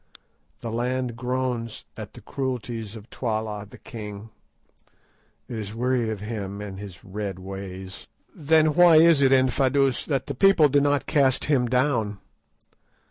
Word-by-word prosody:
The 115 - -4
land 125 +1 -2
groans 125 -2 -3
at - - -8
the - - -12
cruelties 120 -5 -4
of 110 0 -11
Twala 110 -3 -3
the - - -13
king; 105 -1 -9 1.2
it 120 - -6
is 105 0 -6
wearied 125 -1 0
of 110 -3 -4
him 105 -2 -5
and 100 -2 -7
his 100 -4 -10
red 100 -1 -5
ways." 95 0 -7 0.3
"Then 155 0 +3
why 175 -1 +7
is 160 -2 +6
it, 135 -1 +4
Infadoos, 135 0 +2
that 135 -4 -1
the 140 - -4
people 165 0 +5
do 145 +1 +3
not 145 -1 +1
cast 135 -4 +2
him 135 -5 +2
down?" 125 -5 +1
120 Hz, 145 wpm, -25 LUFS, 105-135 Hz, 1.2 s, why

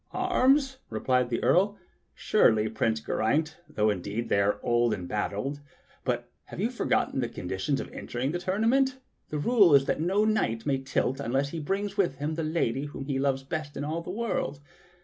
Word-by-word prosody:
"Arms.?" 275 -7 +2
replied 125 +3 +1
the 115 - -2
Earl. 200 +4 +3 0.4
"Surely, 110 - +3
Prince 110 0 0
Geraint, 150 +10 0
though 105 0 +2
indeed 100 +4 -4
they 100 - +3
are 100 +1 +1
old 120 -2 +2
and 90 -3 -7
battered; 105 +8 -2 0.4
but - - -1 0.2
have - - -9
you 225 +5 0
forgotten 250 - 0
the 120 -2 -1
condi 95 +1 -5
tion 135 +8 0
of - - -4
entering 125 +3 -3
the 175 - -2
tournament.? 230 +8 +2 0.3
The 150 - -3
rule 195 -2 +5
is 135 -1 +5
that - - -1
no 195 +6 +2
knight 115 - 0
may 135 -2 +1
tilt 135 0 -1
unless 135 +1 0
he 165 - -5
brings 195 +6 -2
with 175 -9 +2
him 145 +3 -3
the 165 - -2
lady 155 -4 0
whom 145 -2 -7
he 135 -1 -1
loves 135 -1 0
best 150 0 -5
in 140 - -3
all 155 +3 -2
the 170 - -9
world. 190 - -2
145 Hz, 190 wpm, -28 LUFS, 120-195 Hz, 0.4 s, rule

